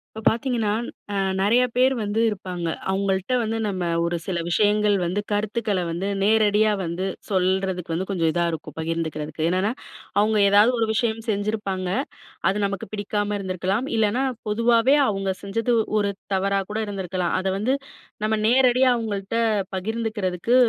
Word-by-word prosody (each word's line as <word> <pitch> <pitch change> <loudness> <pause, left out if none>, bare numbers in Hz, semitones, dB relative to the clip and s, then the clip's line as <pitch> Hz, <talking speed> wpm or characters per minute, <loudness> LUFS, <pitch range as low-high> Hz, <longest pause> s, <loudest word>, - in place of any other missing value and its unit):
இப்ப 220 - -6
பார்த்தீங்கன்னா, 230 -2 +1 0.4
அ - - -2 0.2
நெறைய 230 +6 +4
பேரு 260 +2 +4
வந்து 210 +2 -1
இருப்பாங்க. 180 -4 -4 0.2
அவுங்கள்ட்ட 195 +3 0
வந்து, 225 0 -1
நம்ம 185 -4 -2 0.2
ஒரு 170 0 -1
சில 185 -3 -1
விஷயங்கள் 210 +3 +3
வந்து, 175 +4 -1
கருத்துக்கள 210 -1 0
வந்து 170 +4 -2 0.2
நேரடியா 215 0 +4
வந்து 170 +3 -3 0.2
சொல்றதுக்கு 185 -2 0
வந்து 185 +3 -2
கொஞ்சம் 165 -4 +1
இதா 175 +1 +1
இருக்கும். 155 -2 -7
பகிர்ந்துக்கிறதுக்கு. 160 -1 -3
என்னென்னா, 185 +4 +1 0.5
அவங்க 215 +1 +3
ஏதாவது 205 +4 +6
ஒரு 225 - +3
விஷயம் 225 0 0
செஞ்சிருப்பாங்க, 200 -3 -1 0.6
அது 195 - 0
நமக்கு 195 -1 -3
பிடிக்காம 205 0 -1
இருந்திருக்கலாம். 190 +5 -1
இல்லைனா, 220 +4 +2 0.3
பொதுவாவே, 230 +4 +4
அவுங்க 195 -2 -1
செஞ்சது, 230 +5 0 0.3
ஒரு 200 -1 +1 0.2
தவறா 195 +1 +1
கூட 215 - -2
இருந்திருக்கலாம். 185 -3 -2
அத 190 - -2
வந்து 240 +7 +1 0.5
நம்ம 220 0 +2
நேரடியா 255 +1 +4
அவுங்கள்ட்ட 210 -2 -3 0.4
பகிர்ந்துக்கிறதுக்கு, 215 0 -1
205 Hz, 140 wpm, -23 LUFS, 185-220 Hz, 0.6 s, ஏதாவது